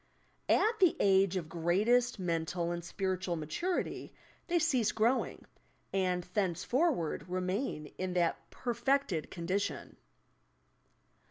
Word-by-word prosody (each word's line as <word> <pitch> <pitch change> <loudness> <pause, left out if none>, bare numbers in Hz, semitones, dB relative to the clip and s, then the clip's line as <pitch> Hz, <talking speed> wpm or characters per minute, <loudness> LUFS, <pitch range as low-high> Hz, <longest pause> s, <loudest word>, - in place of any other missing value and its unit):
At 445 +1 +3
the 365 -4 +5
age 195 -1 +4
of 170 -4 -4
greatest 205 +10 +2
mental 170 -1 -1
and 170 0 -4
spiritual 185 0 -2
maturity 170 - -3 0.3
they 345 - +2
cease 260 -10 +2
growing, 225 +4 0 0.5
and 180 -2 +1
thenceforward 195 - 0
remain 185 - -2
in 185 0 -2
that 175 -2 0
perfected 240 - 0
condition. 185 +3 -3
190 Hz, 100 wpm, -32 LUFS, 175-245 Hz, 0.5 s, the